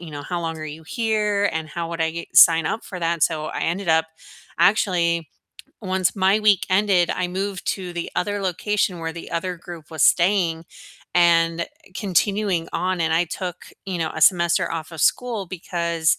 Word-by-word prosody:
you 170 Hz, -2 st, -9 dB
know, 145 Hz, -1 st, -7 dB
how 175 Hz, +3 st, -4 dB
long 165 Hz, -1 st, -4 dB
are 155 Hz, -, -6 dB
you 155 Hz, +1 st, -8 dB
here? 210 Hz, -1 st, 0 dB
And 160 Hz, -1 st, -3 dB
how 165 Hz, +2 st, -4 dB
would 165 Hz, -1 st, -5 dB
I 160 Hz, 0 st, +1 dB
g 170 Hz, +1 st, -7 dB
sign 165 Hz, -1 st, +7 dB
up 225 Hz, -, -3 dB
for 185 Hz, -, -7 dB
that?" 170 Hz, -1 st, -1 dB
So, 155 Hz, -1 st, +1 dB
I -, -, -5 dB
ended 175 Hz, +2 st, -2 dB
up 160 Hz, 0 st, +3 dB, 0.5 s
actually, 170 Hz, -3 st, +2 dB, 0.5 s
once 185 Hz, -2 st, 0 dB
my 195 Hz, +2 st, +3 dB
week 210 Hz, -3 st, +3 dB
ended, 185 Hz, -2 st, +3 dB
I 180 Hz, -, -1 dB
moved 190 Hz, +1 st, -4 dB
to 185 Hz, -2 st, -3 dB
the 170 Hz, -1 st, -5 dB
other 205 Hz, +2 st, -1 dB
location 190 Hz, 0 st, -1 dB
where 165 Hz, 0 st, -4 dB
the 170 Hz, -, -9 dB
other 180 Hz, +2 st, -3 dB
group 170 Hz, -1 st, -11 dB
was 160 Hz, -3 st, -2 dB
staying, 170 Hz, -3 st, +3 dB, 0.5 s
and 170 Hz, -1 st, +3 dB, 0.3 s
continuing 195 Hz, -2 st, 0 dB
on, 180 Hz, +1 st, -1 dB
and 160 Hz, -1 st, +1 dB
I 170 Hz, +2 st, +3 dB
took, 175 Hz, +1 st, -6 dB, 0.2 s
you 185 Hz, -2 st, -3 dB
know, 160 Hz, -1 st, -1 dB
a 160 Hz, -, -5 dB
semester 170 Hz, 0 st, +3 dB
off 160 Hz, 0 st, -5 dB
of 165 Hz, -, -7 dB
school 230 Hz, -, +1 dB
because 170 Hz, -2 st, -1 dB
175 Hz, 190 wpm, -22 LUFS, 165-190 Hz, 0.5 s, sign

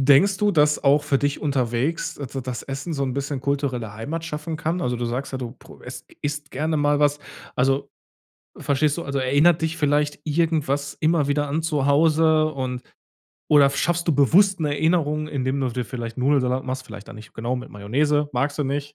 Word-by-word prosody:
denkst 195 Hz, +6 st, +4 dB
du, 210 Hz, -1 st, +2 dB
dass 150 Hz, -2 st, +2 dB
auch 145 Hz, +1 st, +4 dB
für 140 Hz, -2 st, +1 dB
dich 145 Hz, 0 st, -1 dB
unterwegs, 135 Hz, +2 st, -1 dB
da 135 Hz, -1 st, -6 dB
dass 125 Hz, -1 st, -5 dB
Essen 135 Hz, +5 st, -5 dB
so 140 Hz, -3 st, -1 dB
'n 130 Hz, -2 st, -2 dB
bisschen 140 Hz, 0 st, -3 dB
kulturelle 130 Hz, -6 st, -2 dB
Heimat 155 Hz, +10 st, -5 dB
schaffen 155 Hz, 0 st, -5 dB
kann? 165 Hz, +3 st, -2 dB
Also 125 Hz, -5 st, -1 dB
du 120 Hz, -, -2 dB
sagst 125 Hz, +4 st, -3 dB
ja, 130 Hz, -, -3 dB
du 120 Hz, -2 st, -5 dB
pro -, -, -16 dB
es -, -, -9 dB, 0.2 s
isst 145 Hz, 0 st, -4 dB
gerne 155 Hz, +4 st, -1 dB
mal 145 Hz, -1 st, +2 dB
was. 145 Hz, 0 st, +2 dB, 0.4 s
Also 135 Hz, +2 st, +1 dB, 0.7 s
verstehst 145 Hz, +1 st, +1 dB
du? 170 Hz, -, -4 dB
Also 140 Hz, 0 st, -2 dB
erinnert 145 Hz, +6 st, +3 dB
dich 160 Hz, 0 st, -1 dB
vielleicht 145 Hz, -1 st, 0 dB
irgendwas 150 Hz, -3 st, 0 dB
immer 155 Hz, -2 st, +2 dB
wieder 145 Hz, 0 st, 0 dB
an 155 Hz, +3 st, -1 dB
zu 150 Hz, -4 st, 0 dB
Hause 155 Hz, +1 st, +3 dB
und 130 Hz, -2 st, -4 dB, 0.7 s
oder 145 Hz, -2 st, +6 dB
schaffst 170 Hz, +4 st, 0 dB
du 160 Hz, -, +3 dB
bewusst 180 Hz, +7 st, +4 dB
'ne 150 Hz, -2 st, 0 dB
Erinnerung, 155 Hz, -1 st, +1 dB
indem 135 Hz, -2 st, -2 dB
du 130 Hz, -, 0 dB
dir 125 Hz, 0 st, -3 dB
vielleicht 120 Hz, -1 st, -6 dB
Nudelsalat 130 Hz, -1 st, +1 dB
machst? 130 Hz, 0 st, -4 dB
Vielleicht 105 Hz, -2 st, -11 dB
da -, -, -10 dB
nicht, 110 Hz, 0 st, -12 dB
genau 120 Hz, +3 st, -2 dB
mit 125 Hz, -, -8 dB
Mayonnaise, 145 Hz, +9 st, 0 dB
magst 145 Hz, +4 st, -1 dB
du 145 Hz, -, 0 dB
nicht. 145 Hz, +2 st, -3 dB
145 Hz, 200 wpm, -23 LUFS, 130-155 Hz, 0.7 s, oder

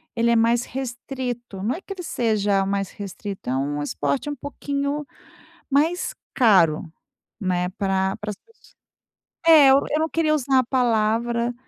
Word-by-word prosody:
ele 235 Hz, 0 st, +2 dB
é 235 Hz, -, +4 dB
mais 230 Hz, +1 st, +3 dB
restrito. 245 Hz, -4 st, -5 dB
Não 225 Hz, +5 st, 0 dB
é 350 Hz, -, -8 dB
que 395 Hz, -, -7 dB
ele 365 Hz, -2 st, -8 dB
seja 210 Hz, -, +1 dB
mais 195 Hz, 0 st, -2 dB
restrito, 200 Hz, -, -7 dB
é 130 Hz, -, 0 dB
um 145 Hz, +2 st, -2 dB
esporte 145 Hz, -, -2 dB
um 290 Hz, -, -3 dB
pouquinho 285 Hz, +1 st, -3 dB, 0.6 s
mais 315 Hz, +6 st, +1 dB, 0.2 s
caro, 175 Hz, -8 st, +3 dB, 0.5 s
né? 180 Hz, -2 st, 0 dB
Pra 190 Hz, 0 st, -1 dB
para 210 Hz, -1 st, -5 dB
as 205 Hz, -, -6 dB
pesso 455 Hz, -, -26 dB, 0.7 s
é, 305 Hz, -4 st, +8 dB
eu 270 Hz, -, +7 dB
eu 305 Hz, -, +1 dB
não 320 Hz, -, +1 dB
queria 315 Hz, -1 st, +1 dB
usar 270 Hz, -2 st, +2 dB
a 255 Hz, -, +3 dB
palavra, 235 Hz, -1 st, +1 dB
235 Hz, 160 wpm, -23 LUFS, 195-280 Hz, 0.7 s, é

